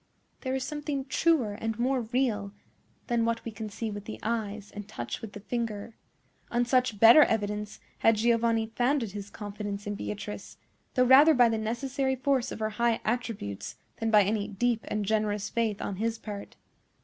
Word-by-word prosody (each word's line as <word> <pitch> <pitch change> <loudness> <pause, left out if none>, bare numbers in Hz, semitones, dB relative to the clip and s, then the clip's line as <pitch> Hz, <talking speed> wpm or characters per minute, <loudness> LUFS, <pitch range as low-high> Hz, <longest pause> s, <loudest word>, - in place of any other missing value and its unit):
There 260 -1 -2
is 265 - -1
something 295 -1 -3
truer 270 -6 +2
and 225 +1 -3
more 255 +2 +1
real 220 -4 -1 0.5
than 235 -2 +1
what 230 0 -1
we 230 - -4
can 215 0 -6
see 220 +1 -4
with 205 0 -7
the 220 - -7
eyes 215 -2 -3
and 205 -1 -8
touch 120 0 -5
with 220 -2 -8
the - - -7
finger. 230 -1 -4 0.5
On 240 0 +1
such 250 -3 +1
better 230 +8 +9
evidence 210 -4 0 0.2
had 225 - +5
Giovanni 230 0 +2
founded 245 -3 +1
his 200 0 -7
confidence 205 -1 -6
in 205 - -2
Beatrice, 210 +1 -6 0.4
though 255 -1 +4
rather 285 +5 +8
by 245 -2 +6
the 225 -1 0
necessary 265 +4 -1
force 260 -1 0
of - - -5
her 215 0 -2
high 235 -1 +3
attributes 215 - -3 0.2
than 225 - -1
by 210 -2 +6
any 205 +1 0
deep 225 +3 0
and 210 -1 -2
generous 210 -1 0
faith 225 -3 0
on 195 - -4
his 225 +2 -1
part. 205 -2 -8
225 Hz, 180 wpm, -28 LUFS, 210-245 Hz, 0.5 s, better